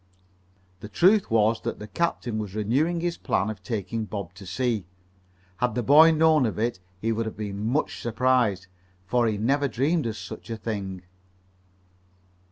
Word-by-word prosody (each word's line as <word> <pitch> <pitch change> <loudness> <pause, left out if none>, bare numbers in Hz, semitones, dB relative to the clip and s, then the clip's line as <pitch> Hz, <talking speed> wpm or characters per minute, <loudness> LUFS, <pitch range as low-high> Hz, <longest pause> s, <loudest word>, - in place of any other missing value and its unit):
The 105 - -9
truth 190 - +4
was 110 0 +2
that - - -4
the 105 - -8
captain 120 -3 -2
was 105 -2 -5
renewing 140 +11 +1
his 175 0 -2
plan 105 +2 0
of 100 -3 -10
taking 110 +2 -3
Bob 100 -4 -6
to 100 0 -12
sea. 110 -1 -1 0.7
Had 125 -3 0
the 125 - 0
boy 150 +6 +8
known 155 -4 +4
of 110 - -4
it 115 -3 -1 0.2
he 115 +3 -1
would 115 0 -1
have 110 - -7
been 105 0 -4
much 140 +6 -1
surprised, 120 -5 +1 0.4
for 120 +4 +2
he 110 -2 0
never 140 +7 +1
dreamed 140 +4 0
of 110 -1 -4
such - - -9
a 115 - -3
thing. 100 -4 -5
115 Hz, 170 wpm, -26 LUFS, 105-135 Hz, 0.7 s, boy